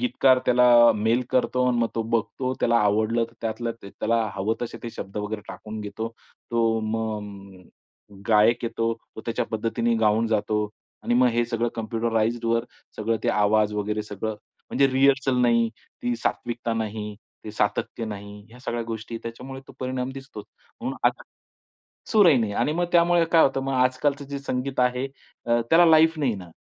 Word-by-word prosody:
गीतकार 135 - +4
त्याला 125 0 +5 0.3
मेल 115 +4 +2
करतो 125 0 +1
आणि 120 -1 +1
मग 115 - +2
तो 115 - 0
बघतो, 115 +3 -1
त्याला 120 0 +3
आवडलं 110 +2 +2
तर 115 - -14
त्यातलं 115 +1 -3
ते 100 - -10
त्याला 115 +1 0
हवं 100 +3 0
तसे 120 - -5
ते 120 - -5
शब्द 95 -1 -8
वगैरे 105 +1 -3
टाकून 110 0 -7
घेतो. 105 +2 -5 0.4
तो 115 -1 +2
मग 100 -2 -8
गायक 110 +3 +4
येतो. 115 0 -1 0.2
तो - - -5
त्याच्या 115 - -1
पद्धतीने 115 +1 0
गाऊन 110 +2 +3
जातो 105 -1 0 0.4
आणि 120 - 0
मग 125 0 +5
हे 120 0 +1
सगळं 120 0 -1
कम्प्युटराईज्डवर 115 +1 0 0.3
सगळं 115 +1 0
ते - - +2
आवाज 105 0 +3
वगैरे 105 +1 -2
सगळं 105 +1 -5 0.3
म्हणजे 140 +1 +4
रिहर्सल 135 0 +3
नाही, 115 -1 +3 0.3
ती 120 0 0
सात्विकता 120 0 -2
नाही, 105 -1 -4 0.3
ते 110 - -6
सातत्य 110 +2 -1
नाही. 105 -1 -8
ह्या 120 +2 -15
सगळ्या 120 -2 -3
गोष्टी 115 0 -6
त्याच्यामुळे 130 +3 -7
तो - - -11
परिणाम 130 0 -2
दिसतोच. 135 -6 -9 0.4
म्हणून - - -3
आता - - 0 0.9
सूरही 185 -10 +6
नाही 110 -3 -1
आणि 150 - 0
मग 175 +2 0
त्यामुळे 170 0 +4
काय 165 - +7
होतं 135 0 +1
मग 135 - -2
आजकालचं 130 +3 +1
जे 140 - -4
संगीत 130 -1 -2
आहे 125 +1 +1 0.4
अ, 120 0 +3
त्याला 170 +2 +7
लाईफ 160 0 +5
नाही 130 -7 +1
ना. 90 -3 -9
115 Hz, 170 wpm, -25 LUFS, 110-125 Hz, 0.9 s, काय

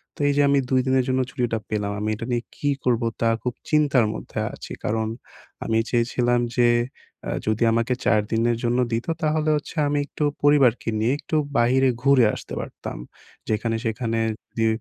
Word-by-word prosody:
তো - - -20
এইযে 145 0 +2
আমি 140 0 +4
২ 130 - +4
দিনের 130 -1 +3
জন্য 130 - +1
ছুটিটা 115 -3 -1
পেলাম। 105 -1 -1
আমি 110 - -1
এটা 115 - -6
নিয়ে 120 0 0
কি 145 - 0
করবো? 120 -2 +1 0.2
তা 115 - +3
খুব 125 -1 -1 0.2
চিন্তার 145 -6 +3
মধ্যে - - -6
আছি। - - -10
কারণ, 110 0 0 0.6
আমি 110 - +1
চেয়েছিলাম 120 0 +1 0.2
যে 120 -1 +5 0.6
আ - - -1 0.2
যদি 110 +2 +1
আমাকে 115 +2 +1
৪ 105 -1 +4
দিনের 115 +1 +2
জন্য 120 +1 +1
দিতো 120 +8 -1
তাহলে 155 0 +1
হচ্ছে 150 - -8
আমি 145 - 0
একটু 150 - -4 0.2
পরিবারকে 135 -6 +4
নিয়ে 115 +4 +2
একটু 150 +2 -4 0.2
বাইরে 130 +3 +4
ঘুরে 135 -3 +5
আসতে - - -9
পারতাম। - - -7 0.5
যেখানে 110 +1 0
সেখানে 115 0 -1 0.4
দে 115 0 +3
120 Hz, 175 wpm, -23 LUFS, 115-135 Hz, 0.6 s, যে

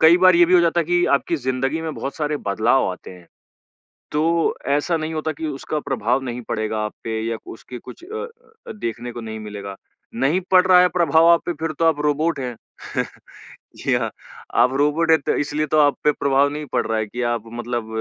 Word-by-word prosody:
कई 160 +2 +7
बार 185 0 +6
ये 175 - +7
भी 180 - +3
हो 180 - +7
जाता 170 0 +2
है - - -1
कि 175 +1 +2
आपकी 165 +4 0
ज़िंदगी 135 +3 -1
में 160 -2 -4
बहुत 135 - -5
सारे 150 -1 -1
बदलाव 110 +6 +2
आते 90 - -9
हैं, 90 -2 -14 0.9
तो 165 +2 +1
ऐसा 145 +4 +1
नहीं 155 0 -4
होता 155 0 -2
कि 155 +2 -6
उसका 150 +1 -3
प्रभाव 125 -1 -1
नहीं 125 -1 -5
पड़ेगा 110 0 -2
आप 105 - -5
पे 110 -1 -2
या 115 - -2
उसके 125 +2 -10
कुछ 335 - -12
अ 445 +4 -5 0.4
अ, - - -5
देखने 120 - -5
को 120 - -7
नहीं 110 -1 -6
मिलेगा। 100 -2 -7 0.4
नहीं 135 +9 +2
पड़ 185 -1 +6
रहा 180 -1 +7
है 180 - +5
प्रभाव 165 -2 +3
आप 170 0 +5
पे 175 - -1
फिर 160 0 -2
तो 165 - +3
आप 160 -2 +3
रोबोट 150 +2 +1
हैं, 125 -2 -4 1.2
जी - - -1
हाँ। - - 0 0.5
आप 125 +2 +3
रोबोट 150 +3 +2
है 160 - +7
तो 140 - -1
इसलिए 150 +1 -1
तो 155 - +2
आप 145 -1 +4
पे 150 - +5
प्रभाव 140 0 +2
नहीं 150 +1 -5
पड़ - - +1
रहा 110 - 0
है 110 - 0
कि 120 +4 -5
आप 115 -2 -2
मतलब 120 -1 -3
145 Hz, 220 wpm, -21 LUFS, 120-165 Hz, 1.2 s, कई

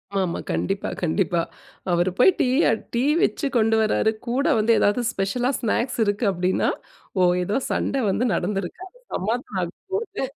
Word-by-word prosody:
ஆமாமா, 190 -3 -1
கண்டிப்பா, 195 0 -1
கண்டிப்பா! 175 0 +1 0.5
அவரு 175 +1 +2
போய் 315 - +7
டீ - - +3 0.2
அ - - +4 0.2
டீ 235 +1 +1 0.2
வச்சு 320 - 0
கொண்டு 225 0 +3
வராரு, 220 0 +2 0.2
கூட 255 +4 0
வந்து 220 +1 +2
ஏதாவது 205 +4 +2
ஸ்பெஷலா 235 +6 -1
ஸ்நாக்ஸ் 235 +2 -1
இருக்கு 205 +2 0
அப்படின்னா, 185 0 0 0.5
"ஓ! - - +4 0.2
ஏதோ 200 +6 -1
சண்ட - - -1
வந்து 225 +6 +1
நடந்திருக்கு! 195 - -3
அது - - -24 0.2
சமாதானம் 215 0 -2
ஆக 170 - -3 0.2
போது." 410 0 -3
210 Hz, 155 wpm, -23 LUFS, 185-245 Hz, 0.5 s, போய்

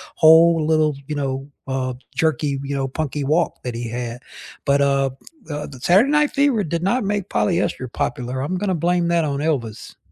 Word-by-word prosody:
whole 160 0 +6
little, 155 -1 +3
you 150 - -3
know, 135 0 -3 0.2
uh, 130 -1 -1 0.2
jerky, 145 -1 0
you 140 0 -3
know, 135 -1 -1
punky 145 0 -3
walk 155 +4 0
that 125 - -4
he 120 0 -4
had. 120 +1 -5 0.5
But, 140 0 +3
uh, 140 -1 +2 0.4
uh, 150 0 -4
the 135 -3 -11
Saturday 200 - +4
Night 300 0 +3
Fever 270 -8 +2
did 170 +2 -2
not 215 +3 +1
make 205 -1 -2
polyester 170 -8 0
popular. 125 0 -3
I'm 180 +7 -2
gonna 190 -1 -1
blame 175 +1 +1
that 170 -1 +2
on 140 -2 -2
Elvis. 125 -8 -3
150 Hz, 185 wpm, -21 LUFS, 135-170 Hz, 0.5 s, whole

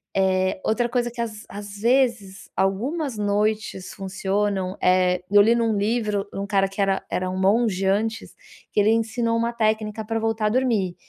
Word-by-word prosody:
Eh, 190 -1 +1
outra 240 +2 +1
coisa 240 0 0
que 235 - -5
às 215 -2 -5
às 205 0 -8
vezes 230 -5 +1
algumas 250 - -1
noites 210 -1 -1
funcionam, 195 0 -2
eh, 180 0 +3
eu 205 0 +7
li 230 +3 +4
num 230 -2 +1
livro, 210 -1 0
um 195 - -3
cara 195 -1 +2
que 195 +1 -4
era 195 -1 +1
era 185 0 -2
um 185 - -3
monge 195 -1 +2
antes, 220 +3 -1 0.4
que - - +2
ele 210 - +3
ensinou 230 +1 0
uma 235 +1 -1
técnica 215 -1 -1
para 225 0 -1
voltar 225 -1 0
a - - +2
dormir, 220 -7 +1
210 Hz, 175 wpm, -23 LUFS, 195-230 Hz, 0.4 s, eu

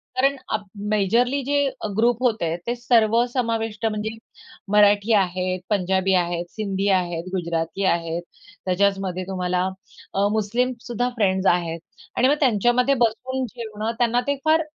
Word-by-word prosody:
कारण 275 +2 +3 0.2
अब 215 -1 -1 0.3
मेजरली 235 +7 +2
जे 285 +3 -1
अ, 220 - -6
ग्रुप 235 +1 +3
होते 220 -9 +1 0.2
ते 240 - 0
सर्वसमाविष्ट 230 -1 +1
म्हणजे 215 -1 -1 0.6
मराठी 205 +1 +5
आहेत, 185 -2 +1
पंजाबी 190 -1 +1
आहेत, 175 0 -3
सिंधी 200 -2 -2
आहेत, 175 -2 -3
गुजराती 170 +1 -2
आहेत, 165 0 -3 0.4
त्याच्याचमध्ये 190 -1 0
तुम्हाला 180 -1 -1 0.5
अ, 200 +1 +2
मुस्लिमसुद्धा 240 +2 -1
फ्रेंड्स 190 -4 +1
आहेत 170 -1 -2 0.4
आणि 255 - +4
मग 285 - +4
त्यांच्यामध्ये 245 +1 +3
बसून 255 +4 -3
जेवणं 220 -2 -4
त्यांना 240 0 +2
ते 285 - +2
फार 320 +1 +4
215 Hz, 130 wpm, -23 LUFS, 185-240 Hz, 0.6 s, मराठी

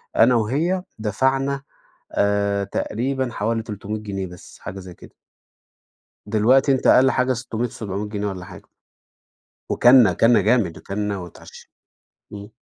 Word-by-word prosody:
أنا 120 +2 +5
وهي 155 - 0 0.2
دفعنا 135 +6 0 0.5
آآ، 100 0 +1
تقريبًا 130 +6 -2
حوالي 110 +1 -2
300 105 0 -6
جنيه 95 -2 -4
بس 90 0 -14
حاجة 95 +2 -8
زي 90 -1 -10
كده. - - -16 1.1
دلوقتي 120 +6 +3
أنت 130 - +1
أقل 130 +1 +6
حاجة 130 0 +1
600 120 0 -3
700 105 -1 -5
جنيه، 105 -1 -3
والّا 90 -2 -6
حاجة. 95 -4 -12 1.1
وأكلنا، 120 -5 +6
أكلنا 115 +3 +4
جامد، 105 -5 +1
وأكلنا 100 0 -4
واتعشينا 90 -2 -12 0.6
إمم. 100 0 -9
110 Hz, 130 wpm, -22 LUFS, 100-125 Hz, 1.1 s, أقل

